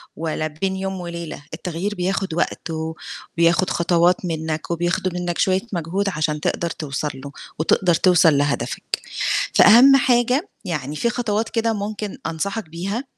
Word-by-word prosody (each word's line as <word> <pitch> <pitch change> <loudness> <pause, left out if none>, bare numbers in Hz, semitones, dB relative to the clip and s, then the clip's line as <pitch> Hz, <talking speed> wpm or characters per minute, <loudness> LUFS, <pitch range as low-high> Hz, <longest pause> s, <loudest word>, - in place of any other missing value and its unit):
ولا 155 -1 -2
بين 190 +5 -3
يوم 190 0 -3
وليلة، 170 -4 -6
التغيير 180 +5 -3
بياخُد 190 0 -1
وقت 170 0 -2
و 160 0 -3 0.4
وبياخُد 170 +2 +3
خطوات 175 +1 +2
منّك 160 -1 -3
وبياخُدوا 175 +2 0
منّك 175 -1 -2
شوية 190 0 +2
مجهود 180 +4 -1
عشان 150 -2 -1
تقدر 170 +3 -1
توصل 150 -1 -3
له 140 +2 -9 0.3
وتقدر 175 +2 +3
توصل 165 -5 +5
لهدفك. 145 0 -1 0.7
فأهم 255 +6 +8
حاجة 255 - +2 0.2
يعني 150 -4 -3
في 235 - 0
خطوات 225 -2 -1
كده 230 -1 0
ممكن 210 0 -4
أنصحك 195 +3 -3
بيها 195 +9 -3
175 Hz, 140 wpm, -21 LUFS, 160-200 Hz, 0.7 s, فأهم